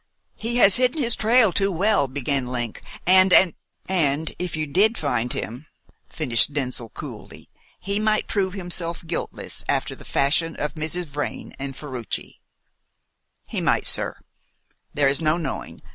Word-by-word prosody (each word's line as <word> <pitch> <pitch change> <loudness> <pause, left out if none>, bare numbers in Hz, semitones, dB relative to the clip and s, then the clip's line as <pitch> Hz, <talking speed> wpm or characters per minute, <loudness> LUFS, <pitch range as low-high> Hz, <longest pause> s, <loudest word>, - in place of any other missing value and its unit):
"He 230 +2 -2
has 200 -4 +6
hidden 255 +4 +2
his 235 -4 +2
trail 225 -3 +4
too 195 0 +2
well," 190 -3 +2
began 135 0 -1
Link, 120 -3 -4 0.2
"and 185 +1 +6
and 180 -2 +6 0.2
" - - -46
"And 160 -4 0
if 180 -3 -3
you 155 0 -1
did 200 +10 +3
find 125 -5 -1
him," 125 +8 -5 0.4
finished 135 -2 +2
Denzil 125 -4 -2
coolly, - - -10 0.3
"he 200 +2 -1
might 215 0 +1
prove 190 -3 0
himself 175 -2 -2
guiltless, - - -5
after - - 0
the - - -12
fashion 160 +4 +1
of 150 - -3
Mrs. 160 +3 -2
Vrain 145 -1 -5
and 135 -1 -5
Ferruci." 130 -8 -5 1.1
"He - - -2
might, - - +2
sir; - - -1 0.7
there 145 -1 +2
is 140 +3 +2
no 155 +1 +2
knowing. 150 -6 -5
160 Hz, 155 wpm, -23 LUFS, 140-195 Hz, 1.1 s, has